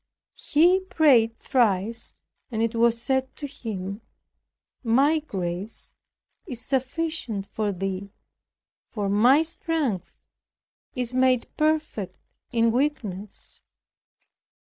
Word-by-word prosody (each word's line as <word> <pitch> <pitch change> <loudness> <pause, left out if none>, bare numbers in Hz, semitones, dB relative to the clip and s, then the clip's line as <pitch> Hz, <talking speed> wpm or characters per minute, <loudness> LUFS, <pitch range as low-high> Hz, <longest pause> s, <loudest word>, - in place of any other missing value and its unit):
He 350 +5 +6
prayed 275 -11 +3
thrice, 225 -2 0 0.3
and 225 -2 -1
it 230 0 0
was 230 0 +3
said 265 +2 -1
to 295 - -6
him, 205 -6 -6 0.8
"My 275 +7 +4
grace 190 - -5 0.5
is 245 -4 -6
sufficient 265 -4 -2
for 210 0 -2
thee; 195 +1 -4 0.8
for 205 -3 -2
my 245 +10 +5
strength 315 - -2 0.8
is 250 -1 -2
made 255 -1 +3
perfect 305 - 0 0.4
in 230 -1 +3
weakness." 220 -7 -3
235 Hz, 95 wpm, -25 LUFS, 205-285 Hz, 0.8 s, He